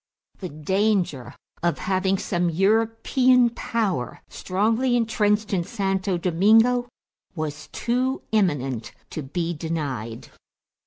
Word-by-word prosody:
The 185 - -5
danger 170 - 0 0.3
of 170 0 +1
having 190 0 0
some 175 -2 0
European 225 - +3
power 210 - -2
strongly 225 +7 0
intrenched 215 -2 +1
in 180 -3 +1
Santo 195 -3 -1
Domingo 225 +8 +3 0.5
was 155 -2 -4
too 255 +3 -1
imminent 140 - 0 0.2
to 155 - -4
be 165 +5 -3
denied. 145 -9 -4
190 Hz, 100 wpm, -24 LUFS, 165-225 Hz, 0.5 s, European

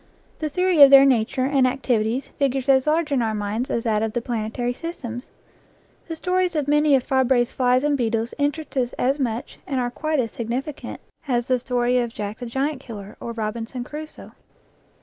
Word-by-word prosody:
The 310 - -2
theory 360 0 +2
of 280 - +11
their 275 0 +9
nature 255 0 +2
and 270 -2 +3
activities 250 -1 -1
figures 270 -1 -1
as 265 0 +4
large 310 0 +1
in 270 -3 +2
our 220 -1 -1
minds 210 +4 -2
as 230 - -1
that 215 -2 +1
of 220 -1 -2
the 240 - -1
planetary 240 +1 -2
systems. 250 -6 -7 0.8
The 325 - -4
stories 360 +1 0
of 295 -2 0
many 295 0 +4
of 260 - +1
Fabre's 260 -2 +2
flies 255 0 +2
and 295 -1 +2
beetles 230 -2 -1
interest 290 +2 -2
us 250 -2 0
as 270 +4 0
much, 235 -3 -3
and 270 -2 -1
are 245 -1 -1
quite 310 +3 -1
as 230 -3 -1
significant, 250 +6 -5 0.3
as 240 -3 0
the 255 0 +1
story 245 0 +1
of 240 -1 -2
Jack 210 +1 -5
the 245 - -5
Giant 270 +4 -2
Killer 210 -6 -9
or - - -6
of 235 - -7
Robinson 225 +3 -4
Crusoe. 305 +4 -9
255 Hz, 195 wpm, -23 LUFS, 235-285 Hz, 0.8 s, of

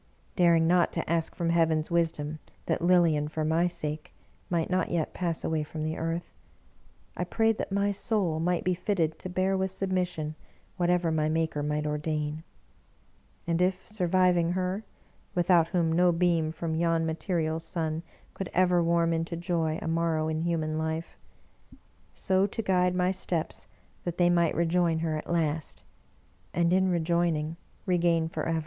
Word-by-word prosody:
Daring 170 -2 +4
not 175 +1 +3
to 165 - -3
ask 165 -1 -1
from 170 -1 0
Heaven's 160 -1 +2
wisdom 160 -3 0 0.3
that - - -1
Lilian, 170 -4 +3
for 155 0 -3
my 165 +3 +2
sake, 155 -3 -5 0.3
might 170 -2 0
not 185 -1 0
yet 165 -3 -1
pass 170 -3 -1
away 160 -1 0
from 155 +1 -5
the 155 +1 -2
earth, 165 +1 -3 0.8
I 180 - -2
prayed 225 +4 +1
that - - -3
my 200 +1 +1
soul 195 -5 0
might 175 +1 0
be 185 - +1
fitted 170 -4 -1
to 185 - -6
bear 185 +2 +1
with 190 0 0
submission 180 -5 -2 0.4
whatever 175 -2 +1
my 155 -1 +1
Maker 160 -2 0
might 150 +1 -1
ordain. 150 0 -2 1.0
And 170 0 0
if 185 +1 0
sur 195 -5 -1
viving 175 -1 +3
her 185 +3 -2 0.3
— - - -19
^without 175 -2 +4
whom 165 -2 +1
no 175 +2 +4
beam 170 -2 +2
from 160 0 -4
yon 165 0 +1
material 160 -1 -1
sun 160 -1 -3 0.3
could 195 - -5
ever 180 -1 +4
warm 170 0 +2
into 165 +1 -2
joy 165 -2 -1
a - - -4
morrow 165 -1 0
in 155 0 -1
human 160 -2 -1
life 160 +1 -3 0.5
— - - -26
so 190 0 +3
to 225 - -4
guide 180 -2 +2
my 180 0 +2
steps 175 -3 -2 0.4
that 175 -1 -4
they 175 -1 +4
might 170 -2 +2
rejoin 170 0 +2
her 160 -1 0
at 155 - -6
last, 160 -2 -1 0.7
and 170 0 +2
in 190 0 +3
rejoining*, 170 -2 0 0.3
regain 170 -3 +2
forever! 165 0 -2
170 Hz, 165 wpm, -28 LUFS, 160-180 Hz, 1.0 s, Daring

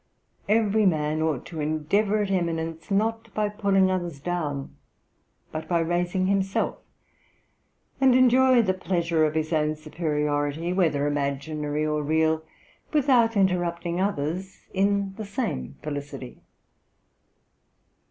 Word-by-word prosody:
Every 215 -1 +3
man 155 -2 0
ought 155 -5 -1
to 165 - -7
endeavour 180 +8 +1
at 200 - -3
eminence, 165 -3 -2
not 225 +2 0
by 210 -1 +1
pulling 200 -3 +2
others 175 -5 -3
down, 150 -4 -3 0.8
but 155 0 -5
by 175 - +2
raising 175 +3 0
himself, 195 0 0 1.2
and 265 -2 +5
enjoy 255 -1 +5
the 190 -3 +1
pleasure 170 -4 +1
of 155 0 -1
his 155 +1 -1
own 155 0 +1
superiority, 150 +1 -1
whether 160 -6 +2
imaginary 145 +1 -2
or 150 0 0
real, 160 +1 +1 0.5
without 255 -7 +3
interrupting 175 -2 0
others 185 0 -2
in 200 0 +1
the 220 - -4
same 65 - -3
felicity.' 145 -3 -6
170 Hz, 115 wpm, -25 LUFS, 155-200 Hz, 1.2 s, and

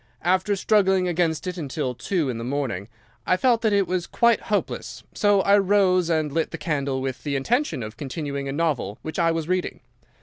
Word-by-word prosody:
After 185 +4 +2
struggling 190 -2 +2
against 165 -3 0
it 180 -1 -4
until 135 -4 -3
two 155 +6 -1
in 120 -3 -3
the - - -5
morning, 125 -7 -3 0.4
I 185 - +3
felt 235 +2 +3
that 220 -2 +2
it 200 -1 +3
was 180 0 -2
quite 235 -1 +3
hopeless, - - -2
so 205 -2 +3
I 200 +2 +5
rose 185 -3 +3
and 155 -3 +1
lit 160 +2 0
the - - -6
candle 140 -4 -2
with 130 -1 -4
the 145 -2 -2
intention 235 - 0
of 110 +1 -8
continuing 140 -1 -4
a - - -2
novel 140 -9 -1
which 160 - -5
I 165 -1 +3
was 165 -1 -1
reading. 185 0 -2
165 Hz, 200 wpm, -24 LUFS, 140-190 Hz, 0.4 s, I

